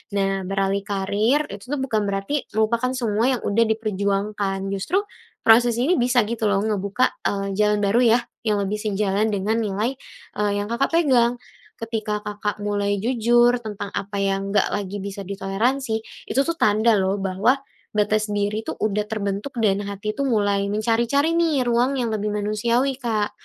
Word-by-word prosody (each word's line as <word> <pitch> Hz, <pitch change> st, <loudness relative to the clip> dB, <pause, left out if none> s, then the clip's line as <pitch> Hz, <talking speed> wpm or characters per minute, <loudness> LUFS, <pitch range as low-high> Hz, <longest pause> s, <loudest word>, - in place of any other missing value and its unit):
Nah, 195 Hz, -1 st, 0 dB
beralih 195 Hz, 0 st, 0 dB
karier 205 Hz, +8 st, +1 dB
itu 200 Hz, +3 st, -9 dB
tuh -, -, +1 dB
bukan 220 Hz, -5 st, 0 dB
berarti 200 Hz, +9 st, -2 dB
melupakan 230 Hz, +3 st, +1 dB
semua 230 Hz, 0 st, +1 dB
yang -, -, -11 dB
udah 220 Hz, +3 st, +3 dB
diperjuangkan, 200 Hz, -2 st, -1 dB
justru 320 Hz, -, 0 dB, 0.4 s
proses 235 Hz, +1 st, +5 dB
ini 290 Hz, +10 st, +2 dB
bisa 245 Hz, -1 st, +3 dB
gitu 220 Hz, 0 st, -1 dB
loh 195 Hz, -1 st, +2 dB
ngebuka, 210 Hz, +2 st, 0 dB, 0.2 s
eee, 200 Hz, 0 st, -1 dB
jalan 210 Hz, 0 st, +3 dB
baru 205 Hz, +4 st, +3 dB, 0.2 s
yah 240 Hz, -, -4 dB, 0.2 s
yang 210 Hz, -1 st, +2 dB
lebih 200 Hz, +2 st, -2 dB
sejalan 210 Hz, 0 st, 0 dB
dengan 210 Hz, +3 st, 0 dB
nilai, 215 Hz, +5 st, -1 dB, 0.4 s
eee, 210 Hz, -1 st, +1 dB
yang 205 Hz, -, -2 dB
Kakak 255 Hz, +4 st, 0 dB
pegang. 250 Hz, -7 st, +3 dB, 0.4 s
Ketika, 215 Hz, -2 st, -3 dB
Kakak 205 Hz, 0 st, -3 dB
mulai 205 Hz, 0 st, 0 dB
jujur 240 Hz, 0 st, +3 dB
tentang 205 Hz, -2 st, -6 dB
apa 200 Hz, +1 st, -4 dB
yang 195 Hz, 0 st, -1 dB
nggak -, -, +3 dB
lagi 200 Hz, 0 st, -3 dB
bisa 200 Hz, 0 st, -6 dB
ditoleransi, 220 Hz, +5 st, -1 dB, 0.3 s
itu 265 Hz, -, 0 dB
tuh 335 Hz, -, -1 dB
tanda 215 Hz, 0 st, +3 dB
loh 195 Hz, +1 st, 0 dB
bahwa 195 Hz, +8 st, +1 dB, 0.4 s
batas 215 Hz, +1 st, +2 dB
diri 205 Hz, +1 st, -1 dB
tuh -, -, -3 dB
udah 210 Hz, 0 st, -1 dB
terbentuk 205 Hz, +4 st, -3 dB
dan 200 Hz, -2 st, +3 dB
hati 205 Hz, +1 st, -3 dB
tuh 280 Hz, +4 st, -2 dB
mulai 205 Hz, -4 st, +1 dB
mencari-cari 235 Hz, +8 st, +1 dB
nih 330 Hz, -5 st, +2 dB
ruang 245 Hz, +3 st, +1 dB
yang 235 Hz, -2 st, -1 dB
lebih 210 Hz, -1 st, -2 dB
manusiawi, 235 Hz, +6 st, 0 dB
Kak. 220 Hz, -4 st, -1 dB
215 Hz, 165 wpm, -23 LUFS, 200-235 Hz, 0.4 s, proses